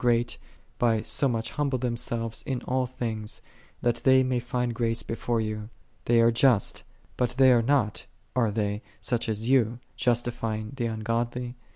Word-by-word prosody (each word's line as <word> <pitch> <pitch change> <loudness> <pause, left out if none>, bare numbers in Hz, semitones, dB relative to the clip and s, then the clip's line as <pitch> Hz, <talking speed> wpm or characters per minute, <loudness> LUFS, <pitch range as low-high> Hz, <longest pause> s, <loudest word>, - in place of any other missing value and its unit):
great, 120 -1 +2 0.4
by 115 -2 +3
so 110 +6 +1
much 115 -3 -2
humble 140 -3 0
themselves 115 -2 -2
in 130 -2 -1
all 130 0 0
things, 110 -4 -4 0.4
that 120 -1 +2
they 130 0 +5
may 130 -1 0
find 120 0 -2
grace 115 -1 -1
before 115 0 -1
Thee. 110 0 -2 0.5
They 120 0 +4
are 115 0 +5
just: 115 -2 +3 0.3
but 125 -1 +2
they 130 -1 +7
are 120 -2 +5
not, 120 -4 +1 0.3
are 120 -3 +3
they, 105 0 -1 0.2
such 120 -2 -1
as 110 +1 -2
Thou, 120 -3 +3 0.2
justifying 115 -3 -1
the 120 -3 -1
ungodly? 115 +2 -2
120 Hz, 160 wpm, -27 LUFS, 115-125 Hz, 0.5 s, they